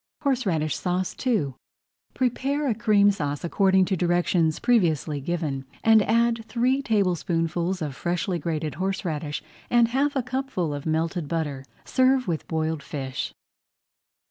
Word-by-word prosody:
HORSERADISH 200 - 0
SAUCE 180 0 -1
II 155 - +1 0.6
Prepare 275 +3 0
a 240 - +2
Cream 205 -2 +4
Sauce 145 -6 -3
according 190 +2 +3
to 190 - 0
directions 175 -2 +1
previously 160 - +1
given, 150 -4 -2 0.2
and 220 -1 +6
add 230 +1 +2
three 255 +3 +1
tablespoonfuls 180 - 0
of 145 -3 -4
freshly 175 +2 -1
grated 155 -1 -2
horseradish 165 -6 -2 0.3
and 235 -1 +4
half 280 +4 +1
a 265 - +1
cupful 255 - -2
of 145 +2 -5
melted 160 +1 -1
butter. 150 -4 -2 0.2
Serve 260 0 +3
with 165 -3 -2
boiled 160 -1 -1
fish. 135 -2 -4
180 Hz, 130 wpm, -25 LUFS, 155-235 Hz, 0.6 s, and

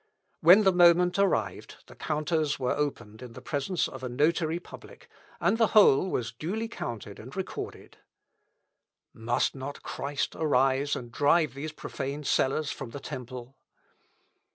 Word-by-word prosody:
When 180 +6 +7
the 190 - +5
moment 175 +1 +5
arrived, 200 -1 -1
the - - -14
counters 155 0 -1
were 125 -1 0
opened 115 -7 -4
in 125 -2 -9
the - - -9
presence 155 +5 -1
of 130 - -9
a 125 - -3
notary 160 +5 +1
public, - - -14 0.3
and 225 - +1
the 225 - +5
whole 190 -3 +6
was 115 -9 -2
duly 195 - -4
counted 115 - -7
and 125 +8 -11
recorded. 190 -1 -7 1.1
Must 120 +2 0
not 135 +1 -7
Christ 140 0 -3
arise 135 -2 +2
and 120 -1 -7
drive 145 +3 +2
these 145 +3 -6
profane 145 -1 -5
sellers 140 +2 +1
from 135 - -7
the 140 - -8
temple? 130 -2 -8
145 Hz, 145 wpm, -28 LUFS, 130-170 Hz, 1.1 s, When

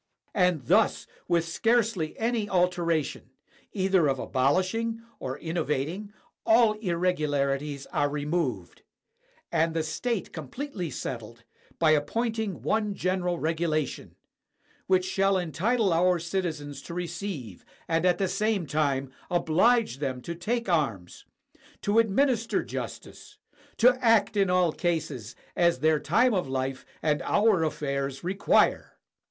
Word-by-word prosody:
And 180 -8 +2
thus, - - +3 0.2
with 170 -1 +1
scarcely 220 -3 +1
any 225 -2 -1
altera 175 -3 +2
tion, 125 - -9 0.4
either 190 -5 +2
of 135 -1 +1
abolishing 185 - 0 0.2
or 130 +1 -4
innovating, 165 +4 -3 0.3
all 225 -1 +5
irregularities 150 -7 -1
are 145 - +2
removed, 145 - -2 0.7
and 165 +1 +1
the 160 - +1
state 230 +7 -3
completely 180 - -5
settled, 115 -4 -6 0.3
by 160 -2 +4
appointing 220 +6 -1
one 210 -2 0
general 180 -2 -1
regulation, 160 -3 -2 0.7
which 185 -1 +3
shall 195 +1 +2
entitle 195 +4 +1
our 180 +2 +3
citizens 165 -5 -3
to 170 - -8
receive, 170 - -5 0.2
and 165 0 +1
at 180 -1 +3
the 195 - 0
same 195 0 0
time 140 -3 0 0.2
oblige 175 - +2
them 130 -3 -2
to 170 - -4
take 230 +7 -2
arms, 135 - -1 0.6
to 205 +3 +3
administer 230 +1 +2
justice, - - -8 0.4
to 250 +2 +4
act 225 -2 +4
in 195 -2 +2
all 180 -2 +3
cases 150 - -3 0.2
as 170 -1 +3
their 155 +2 +2
time 230 - +3
of 185 -7 0
Hfe 130 0 -3 0.2
and 150 -1 +1
our 205 -5 +3
affairs 140 -3 -2
require. 195 +3 +2
175 Hz, 125 wpm, -27 LUFS, 150-200 Hz, 0.7 s, all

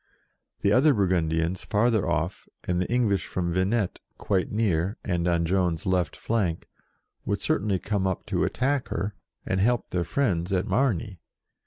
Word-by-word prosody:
The 100 - +3
other 140 +3 +5
Burgundians, 85 -3 +1
farther 110 0 +2
off, 80 +6 -2 0.2
and 90 0 0
the 90 - -3
English 115 -5 +1
from 85 -2 -2
Venette, 95 +2 0 0.2
quite 95 -2 0
near, 100 -3 0
and 90 -2 0
on 85 -1 +2
Joan's 90 -2 0
left 90 -4 +1
flank, 95 -8 -1 0.6
would - - -1
certainly 100 -1 0
come 100 0 -1
up 95 - -2
to - - 0
attack 135 +2 0
her, 100 +5 -3 0.3
and 95 - 0
help 120 +4 +1
their 90 -1 0
friends 90 - 0
at 95 0 +1
Margny. 110 -7 0
95 Hz, 155 wpm, -26 LUFS, 85-110 Hz, 0.6 s, other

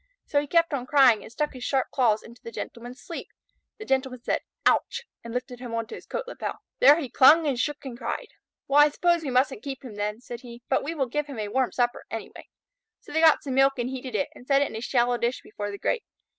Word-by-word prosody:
So 285 - +2
he 290 - -7
kept 335 +1 +3
on 255 -3 -2
crying 255 -7 +6
and - - -11
stuck 300 +4 -2
his 255 -2 -8
sharp 265 0 0
claws 225 -5 +2
into 235 0 -14
the 230 - -8
Gentleman's 240 +2 -7
sleeve. 335 - -7 0.5
The 430 - -8
Gentleman 260 - -1
said - - 0 0.2
"Ouch!" 480 - +2 0.2
and 230 - -7
lifted 250 +1 -4
him 240 -2 -5
on 230 0 -1
to - - -11
his - - -10
coat - - -3
lapel. - - -4 0.2
There 290 +5 +7
he 290 - -3
clung 300 +6 +6
and 270 -5 0
shook 295 +1 -2
and 255 -3 -6
cried. 250 - -4 0.4
"Well, 280 +1 +4
I 295 - +7
suppose 345 +3 +2
we 295 - -4
mustn't 255 -2 +1
keep 270 0 -6
him 240 - -8
then," 210 +1 -3
said 240 -1 -8
he; 240 -1 -11
"but 265 - +2
we 320 +4 -4
will 275 -4 +1
give 295 +4 -2
him 280 -4 -8
a 210 -1 -3
warm 260 +2 +1
supper 245 -1 0
anyway." 225 - -7 0.5
So - - -14
they 320 - +1
got 320 -1 +6
some 270 - -3
milk 270 +1 +5
and 245 +1 -2
heated 260 -1 -6
it, 280 - 0
and 250 - -15
set 275 0 +4
it - - -2
in - - -8
a 220 - -4
shallow 245 -1 +1
dish 240 +2 -1
before 205 -1 -6
the 200 - -6
grate. 465 - 0
260 Hz, 255 wpm, -26 LUFS, 240-285 Hz, 0.5 s, There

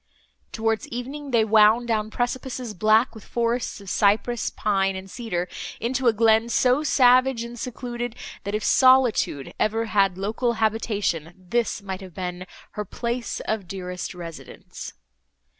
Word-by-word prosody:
Towards 225 -1 -1
evening, 275 +4 -6
they 230 -4 +3
wound 220 +2 +5
down 215 -2 0
precipices, 245 0 -3
black 215 +5 +3
with 220 -3 -12
forests 235 -1 -1
of 200 - -13
cypress, 215 +5 +1
pine 195 -2 0
and 190 0 -7
cedar, 190 -5 -3 0.3
into 255 +3 0
a - - +7
glen 225 +1 +3
so 250 +3 +3
savage 255 -4 +4
and 235 0 -8
secluded, 240 -1 -5 0.3
that, 200 +1 -3
if 215 - -2
Solitude 255 - +3
ever 225 +1 +1
had 195 -4 +2
local 225 +5 -1
habitation, 210 -7 -1
this 220 +3 -2
might 190 -1 -5
have 185 -3 -11
been 180 0 -5 0.2
"her 210 - -4
place 235 +4 -4
of 215 -4 -3
dearest 180 0 -5
residence." 170 -2 -9
220 Hz, 140 wpm, -24 LUFS, 195-240 Hz, 0.3 s, a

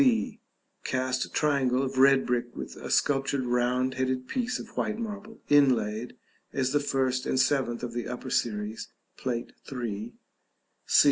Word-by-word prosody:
b. 240 -3 +2 0.4
Cast 130 -1 -1
triangle 135 -4 +2
of 130 0 -2
red 135 0 +6
brick 120 -1 -1
with - - -6
a - - -7
sculptured 135 -2 +2
round 125 +1 +1
headed 130 0 -1
piece 250 -1 -1
of 230 - -10
white 215 - -1
marble 220 -1 -6
inlaid 125 -5 +3 0.4
(as 130 -1 0
the 145 - +3
first 130 -2 0
and 130 - +1
seventh 130 -3 +1
of 120 -1 -4
the 120 0 -3
upper 125 +1 -5
series, 105 -1 -1 0.3
Plate 120 -2 -3 0.2
III.). 115 -4 -4 0.7
c. - - +6
130 Hz, 150 wpm, -28 LUFS, 125-140 Hz, 0.7 s, red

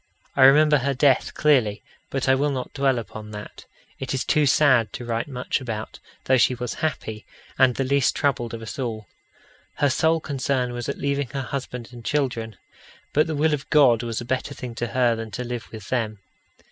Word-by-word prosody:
I 130 - +7
remember 150 +2 +6
her 140 +2 -1
death 135 0 +2
clearly, 125 -9 +2 0.3
but 135 -1 -2
I 130 - +6
will 140 +2 +2
not 130 -3 -4
dwell 135 -2 +2
upon 110 -1 -7
that. 105 0 -9 0.3
It 135 0 -3
is 130 - -2
too 150 -1 +3
sad 130 -6 +4
to 120 - -6
write 115 +1 -2
much 130 0 -2
about, 110 -4 -5 0.2
though 130 - +3
she 125 - +3
was 125 -1 -4
happy, 110 -9 -3 0.4
and 130 -2 +5
the 135 - 0
least 140 0 +2
troubled 120 -5 0
of 115 - -8
us 110 - -7
all. 110 -4 -3 0.7
Her 145 -1 +2
sole 160 +5 +2
concern 135 -4 -1
was 120 -1 -4
at - - -3
leaving 140 -1 -1
her 135 -1 -2
husband 125 -2 -5
and 120 -1 -11
children. 115 -7 -1 0.6
But 150 +2 +3
the 160 - -2
will 155 +1 +2
of 145 -1 -4
God 130 -6 +5
was 115 -2 -3
a 120 - -6
better 130 +3 -2
thing 125 -2 -7
to 120 +1 -3
her 120 -1 +2
than 115 0 -6
to 125 - -5
live 120 -1 -6
with 110 -3 -9
them. 115 -4 -1
130 Hz, 205 wpm, -24 LUFS, 115-140 Hz, 0.7 s, I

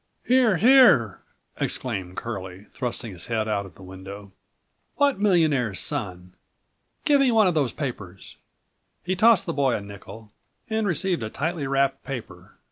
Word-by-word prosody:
"Here! 245 -6 +3
Here!" 230 - +5 0.4
exclaimed 95 -8 -4
Curlie, 95 -4 -6
thrusting 120 -3 -4
his 90 +3 -5
head 110 -2 -1
out 100 -2 -2
of 85 - -18
the 95 - -14
window. 95 +2 -10 0.6
"What 280 -6 +2
millionaire's 155 - +2
son? 90 -10 -5 0.7
Give 285 -2 +4
me 270 - +4
one 220 -2 +4
of 180 - +2
those 140 -7 0
papers." 100 - -7 0.7
He 185 +1 -1
tossed 215 -1 +4
the 165 - -3
boy 140 -4 +1
a - - -2
nickel 100 +2 -12 0.4
and 220 -1 -1
received 180 -3 0
a 110 - -4
tightly 155 +3 -3
wrapped 135 0 0
paper. 130 -4 -8
130 Hz, 150 wpm, -24 LUFS, -, 0.7 s, Here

